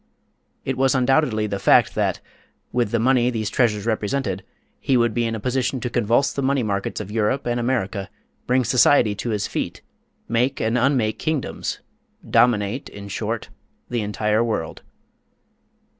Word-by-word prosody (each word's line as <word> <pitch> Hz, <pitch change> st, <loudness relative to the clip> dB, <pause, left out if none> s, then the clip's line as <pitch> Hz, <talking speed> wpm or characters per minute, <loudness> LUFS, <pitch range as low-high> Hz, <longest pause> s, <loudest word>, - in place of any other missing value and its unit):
It 130 Hz, -1 st, -2 dB
was 135 Hz, 0 st, +3 dB
undoubtedly 130 Hz, -4 st, +2 dB
the 100 Hz, -2 st, -3 dB
fact -, -, +4 dB
that, -, -, -1 dB, 0.5 s
with 120 Hz, -4 st, +1 dB
the 115 Hz, -, +1 dB
money 125 Hz, +1 st, +3 dB
these 110 Hz, -4 st, -2 dB
treasures 110 Hz, -5 st, +1 dB
represented, 110 Hz, -3 st, -1 dB, 0.4 s
he 135 Hz, -, +2 dB
would 120 Hz, -2 st, +2 dB
be 120 Hz, +1 st, 0 dB
in 115 Hz, -, -2 dB
a -, -, -4 dB
position 130 Hz, +3 st, -1 dB
to 120 Hz, 0 st, -4 dB
convulse 120 Hz, +4 st, +2 dB
the 140 Hz, -, -2 dB
money 135 Hz, -1 st, +1 dB
markets 100 Hz, -2 st, -2 dB
of 105 Hz, -1 st, -6 dB
Europe 110 Hz, +5 st, 0 dB
and 120 Hz, 0 st, 0 dB
America, 110 Hz, -6 st, -1 dB, 0.4 s
bring 125 Hz, +1 st, +3 dB
society 120 Hz, -1 st, +4 dB
to 110 Hz, +4 st, -4 dB
his 105 Hz, -3 st, -1 dB
feet, -, -, -4 dB, 0.4 s
make 125 Hz, +4 st, 0 dB
and 110 Hz, +2 st, 0 dB
unmake 125 Hz, -4 st, +1 dB
kingdoms 155 Hz, -4 st, -3 dB, 0.5 s
dominate, 115 Hz, 0 st, +2 dB
in 100 Hz, 0 st, -10 dB
short, 95 Hz, -, -3 dB, 0.4 s
the 120 Hz, -2 st, 0 dB
entire 105 Hz, +1 st, 0 dB
world. 110 Hz, -9 st, -3 dB
120 Hz, 160 wpm, -22 LUFS, 105-130 Hz, 0.5 s, fact